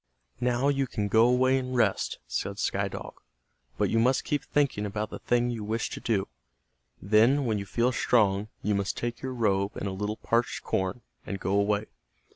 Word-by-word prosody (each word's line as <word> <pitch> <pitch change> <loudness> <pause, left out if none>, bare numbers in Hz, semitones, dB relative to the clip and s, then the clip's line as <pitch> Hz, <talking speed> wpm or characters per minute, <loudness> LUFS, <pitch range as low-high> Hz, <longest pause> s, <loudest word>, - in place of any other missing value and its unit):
"Now 125 +2 +1
you 135 -1 +1
can 105 -4 -2
go 110 +3 +5
away 130 +2 +3
and 130 0 -4
rest," 120 - +1
said - - -3
Sky - - 0
Dog. - - -8 0.6
"But - - +1
you 115 - +3
must 125 +3 +3
keep 145 - -1
thinking 140 -8 0
about 105 +1 -3
the - - -6
thing 120 0 +1
you 115 -3 -4
wish 110 +2 -2
to - - -5
do. 105 -5 0 0.7
Then, 115 +8 +4
when 110 -3 0
you 100 - -6
feel 120 +4 +1
strong, 105 -5 +2 0.2
you 105 - +1
must 100 0 -1
take 120 0 -3
your 130 -1 -4
robe 100 -3 0
and - - -3
a - - -2
little 105 +3 -3
parched 115 +1 0
corn, 95 +5 -1 0.2
and 100 - -5
go 95 - -2
away. 100 +1 +2
115 Hz, 195 wpm, -28 LUFS, 100-125 Hz, 0.7 s, go